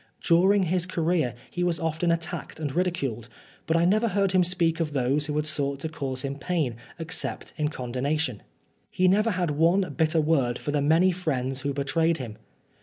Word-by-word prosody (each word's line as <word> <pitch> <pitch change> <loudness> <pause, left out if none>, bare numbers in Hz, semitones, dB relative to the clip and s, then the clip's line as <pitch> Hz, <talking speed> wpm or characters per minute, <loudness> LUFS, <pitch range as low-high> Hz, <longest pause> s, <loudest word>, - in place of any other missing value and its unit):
During 190 +4 +4
his 180 0 +1
career 165 -7 0 0.2
he 175 - -2
was 175 -2 +1
often 165 +1 0
attacked 170 -1 -3
and 145 -4 -3
ridiculed, 140 -11 -1 0.4
but 160 - +2
I 170 - +3
never 215 +6 +3
heard 195 -2 +1
him 185 -1 +4
speak 170 -2 +1
of 165 - +1
60 - - -11
Oscar - - +2
Wilde 125 +2 +1
those 150 0 +1
who 150 - -3
had 150 0 0
sought 140 -2 -1
to 160 - -3
cause 135 -4 -4
him 140 0 -4
pain 155 -10 -1 0.2
except 165 0 -4
in 150 -2 0
condonation. 130 -1 -2 0.5
He 185 - +2
never 210 +5 +3
had 180 -6 0
one 165 +3 +2
bitter 160 0 +2
word 140 -6 +1
for 145 - -4
the 145 -1 +1
many 165 +6 +4
friends 135 -7 -2
who 140 - -1
betrayed 160 +4 +1
him. 120 -6 -7
160 Hz, 200 wpm, -26 LUFS, 140-175 Hz, 0.5 s, During